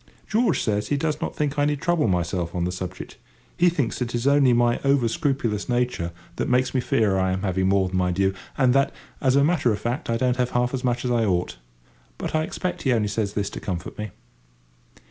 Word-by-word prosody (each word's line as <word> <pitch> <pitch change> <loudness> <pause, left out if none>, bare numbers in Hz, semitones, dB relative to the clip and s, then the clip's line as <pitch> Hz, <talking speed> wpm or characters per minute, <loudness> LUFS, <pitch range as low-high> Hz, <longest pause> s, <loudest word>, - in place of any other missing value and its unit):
George 220 -3 +2
says 105 -1 0
he 145 - 0
does 150 0 -1
not - - -3
think 145 -1 -1
I 145 - +3
need 145 -1 0
trouble 175 -5 +1
myself 90 -1 -1
on 90 - 0
the 90 - -1
subject. 90 0 -7 0.4
He 175 +1 +4
thinks 145 -8 -2
it 120 -1 -2
is 120 +1 -2
only 140 -2 +5
my 120 0 +3
over 135 -3 +3
scrupulous 125 - -1
nature 120 -8 0 0.3
that - - -1
makes 125 +1 +2
me 130 - +1
fear 105 -5 +2
I 95 0 +1
am 95 +1 -2
having 95 -1 +1
more 95 -1 +3
than 95 0 -2
my 90 0 +1
due; 95 +1 +1 0.2
and 130 -3 +4
that, 135 +1 +3 0.3
as 130 -1 +3
a 140 - +5
matter 145 -6 +2
of 105 - 0
fact, 120 +7 -3
I 115 - +1
don't 125 +1 +1
have 125 -1 +1
half 125 +1 +1
as 130 -1 -3
much 120 0 0
as 125 - 0
I 120 -1 +2
ought. 90 - -1 0.6
But - - -4
I 155 - +2
expect 180 +3 -3
he 130 - +2
only 105 -3 +1
says 105 -1 -2
this 100 -1 -2
to - - -6
comfort 90 -2 -5
me. 105 0 -3
120 Hz, 235 wpm, -24 LUFS, 100-140 Hz, 0.6 s, only